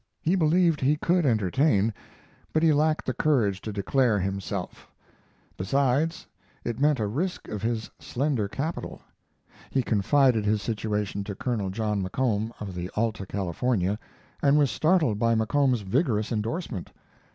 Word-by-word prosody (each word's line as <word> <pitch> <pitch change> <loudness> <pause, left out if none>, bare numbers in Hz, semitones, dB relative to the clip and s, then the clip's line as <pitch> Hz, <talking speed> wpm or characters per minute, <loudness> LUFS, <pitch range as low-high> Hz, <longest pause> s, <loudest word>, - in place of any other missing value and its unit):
He 165 - +2
believed 170 -2 +3
he 140 +3 +3
could 170 +1 +1
entertain, 110 - +2 0.6
but 155 - +2
he 160 -2 +5
lacked 155 +1 +1
the 130 - -1
courage 115 -12 +1
to 110 - -5
declare 110 +3 +2
himself; 95 -1 -4 0.7
besides, 140 - +1 0.4
it 120 0 -3
meant 145 -1 +3
a 110 - 0
risk 160 - -3
of 105 - -4
his 110 0 -2
slender 130 -5 -1
capital. 145 +10 -4 0.7
He 130 - +1
confided 115 +2 +3
his 105 0 +1
situation 105 -2 -2
to 100 -1 -5
Col. 110 -4 -2
John 105 0 -1
McComb, 110 +2 -1
of 100 -3 -6
the 90 0 -4
Alta 110 -3 -1
California, 100 +1 -1 0.4
and 140 +1 +4
was 145 -4 +3
startled 155 - +2
by 115 0 +3
McComb's 125 +2 +2
vigorous 110 - 0
endorsement. 115 - -3
115 Hz, 140 wpm, -26 LUFS, 105-145 Hz, 0.7 s, he